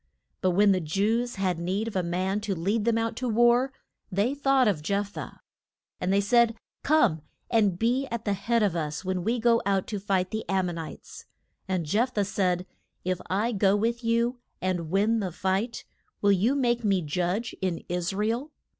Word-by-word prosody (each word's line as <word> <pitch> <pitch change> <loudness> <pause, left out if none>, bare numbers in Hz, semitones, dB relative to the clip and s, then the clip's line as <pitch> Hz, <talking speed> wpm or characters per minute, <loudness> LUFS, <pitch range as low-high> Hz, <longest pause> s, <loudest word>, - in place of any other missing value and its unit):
But 185 - +3
when 205 0 +6
the 185 - +2
Jews 215 +9 0
had 185 -4 -1
need 190 +6 -1
of 225 - -6
a 185 - +2
man 185 +4 -1
to 205 -2 -2
lead 205 +6 0
them 230 -1 +2
out 230 0 -1
to 250 -1 -2
war, 240 +3 +4 0.4
they 205 +8 +1
thought 270 -3 +3
of 185 -8 +1
Jeph 200 +5 -1
thah. - - -8 0.6
And 180 - -1
they 200 - +4
said, 230 +2 +3 0.3
Come, 285 - +3 0.3
and 210 -6 +3
be 245 +6 +1
at 235 -2 -5
the 205 - +1
head 225 +4 +1
of 195 -4 +1
us 155 +1 -3
when 185 -1 -1
we 230 +5 +1
go 230 0 +3
out 195 -1 +1
to 210 - -3
fight 190 -1 0
the 220 0 -2
Am 190 -1 +2
mon 175 -2 -4
ites. 160 - -9 0.4
And 185 -3 -1
Jeph 230 - 0
thah 205 - +2
said, 185 -2 0 0.4
If 185 -1 -1
I 210 +6 +1
go 200 -2 +3
with 235 +3 -1
you, 235 +2 +1 0.2
and 175 -3 -2
win 210 +5 +2
the 190 -4 -2
fight, 190 +7 -2 0.3
will 205 - +3
you 210 +8 +3
make 240 -3 +1
me 195 -4 +2
judge 180 +9 -1
in 185 -3 -2
Is 180 0 -1
ra 205 +2 -1
el? 240 +7 -2
200 Hz, 200 wpm, -27 LUFS, 185-230 Hz, 0.6 s, when